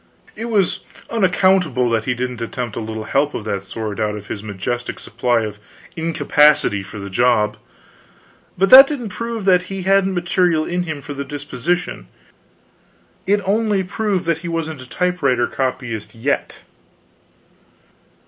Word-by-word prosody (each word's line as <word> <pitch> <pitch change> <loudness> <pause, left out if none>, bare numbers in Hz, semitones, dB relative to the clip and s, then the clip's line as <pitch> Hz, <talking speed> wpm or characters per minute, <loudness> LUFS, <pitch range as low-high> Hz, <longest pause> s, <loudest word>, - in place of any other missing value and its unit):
It 225 - -5
was 210 -6 +1 0.3
unaccountable 185 - +2
that 110 -1 0
he 125 - 0
didn't 125 -1 -4
attempt 115 -1 -4
a - - -3
little 110 -1 -5
help 140 +6 0
of 110 - -4
that 100 -2 -2
sort 105 +1 -6
out 105 -1 0
of 105 -1 -8
his 100 - -4
majestic 110 +4 -4
supply 120 0 0
of 105 -1 -5 0.4
incapacity 150 -8 +3
for 100 +3 -10
the 100 -1 -6
job. 105 +1 +2 1.0
But 195 +1 +2
that 270 +1 +12
didn't 255 -7 -4
prove 230 +1 -5
that 180 -2 +5
he 195 -1 -4
hadn't 195 0 +3
material 175 -2 +1
in 175 +1 -1
him 155 -4 -5
for 145 - -6
the 140 0 -4
disposition, 145 - -3 1.2
it 200 0 +1
only 205 -1 +1
proved 195 0 -1
that 165 -1 0
he 175 - -7
wasn't 160 -4 -3
a 130 - -12
typewriter 165 -9 +1
copyist 125 -5 -3
yet. 135 +5 -2
145 Hz, 150 wpm, -19 LUFS, 115-185 Hz, 1.2 s, that